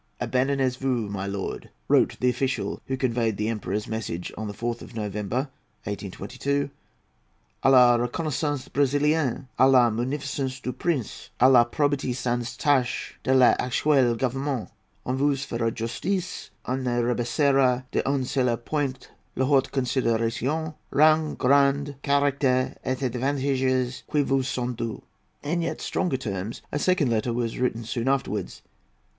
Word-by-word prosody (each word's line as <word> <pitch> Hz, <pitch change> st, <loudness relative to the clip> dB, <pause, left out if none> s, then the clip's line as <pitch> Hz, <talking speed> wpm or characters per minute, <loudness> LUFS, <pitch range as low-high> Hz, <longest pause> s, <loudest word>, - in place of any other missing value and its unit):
"Abandonnez 130 Hz, 0 st, +1 dB
vous, 125 Hz, -5 st, -1 dB
milord," 100 Hz, 0 st, -4 dB, 0.2 s
wrote -, -, +3 dB
the 125 Hz, -, +3 dB
official 135 Hz, +1 st, -2 dB
who 130 Hz, -, -2 dB
conveyed 115 Hz, -5 st, 0 dB
the 105 Hz, -, -1 dB
Emperor's 105 Hz, -2 st, -3 dB
message, 105 Hz, -6 st, -4 dB
on 110 Hz, 0 st, -5 dB
the 105 Hz, -, -5 dB
4th 120 Hz, +2 st, -3 dB
of -, -, -11 dB
November, 105 Hz, +5 st, -2 dB, 0.4 s
1822, 125 Hz, +8 st, -3 dB, 0.9 s
"à -, -, +5 dB
la 125 Hz, -2 st, +7 dB
reconnaisance 145 Hz, +2 st, -2 dB
Brésilienne, 145 Hz, -1 st, +1 dB
à 130 Hz, +1 st, +6 dB
la 125 Hz, -3 st, +5 dB
munificence 130 Hz, +2 st, -3 dB
du 125 Hz, 0 st, -4 dB
Prince, 150 Hz, -11 st, -3 dB
à 130 Hz, +2 st, +7 dB
la 120 Hz, -2 st, +8 dB
probité 140 Hz, -1 st, 0 dB
sans 120 Hz, -1 st, -2 dB
tache 135 Hz, -5 st, 0 dB
de -, -, -1 dB
l'actuel 130 Hz, 0 st, +3 dB
Gouvernement; 135 Hz, 0 st, -2 dB, 0.3 s
on 125 Hz, -, -1 dB
vous 140 Hz, +1 st, +2 dB
fera 115 Hz, -4 st, -1 dB
justice; 180 Hz, -, -3 dB, 0.2 s
on 130 Hz, -, -1 dB
ne 120 Hz, -1 st, 0 dB
rabaissera 125 Hz, +2 st, +2 dB
d'un 135 Hz, -1 st, 0 dB
seul 125 Hz, -2 st, +1 dB
point 135 Hz, +1 st, -3 dB, 0.3 s
la 130 Hz, -, +1 dB
haute 135 Hz, -1 st, +2 dB
considération, 130 Hz, +4 st, 0 dB, 0.2 s
rang, 155 Hz, +1 st, +4 dB
grade, 140 Hz, +1 st, +3 dB
caractère, 140 Hz, -3 st, +1 dB
et 130 Hz, -, -1 dB
avantages 130 Hz, 0 st, 0 dB
qui 150 Hz, -, +3 dB
vous 135 Hz, 0 st, +1 dB
sont 125 Hz, -1 st, -2 dB
dûs." 115 Hz, -1 st, -5 dB, 0.4 s
In 170 Hz, +4 st, -1 dB
yet 165 Hz, -, -3 dB
stronger 170 Hz, -8 st, -1 dB
terms 105 Hz, -3 st, -5 dB
a 145 Hz, -, -1 dB
second 180 Hz, -3 st, +2 dB
letter 115 Hz, +2 st, 0 dB
was 115 Hz, -1 st, -2 dB
written 120 Hz, -2 st, 0 dB
soon 115 Hz, +2 st, -3 dB
afterwards. 105 Hz, -8 st, -1 dB
130 Hz, 140 wpm, -25 LUFS, 120-140 Hz, 0.9 s, la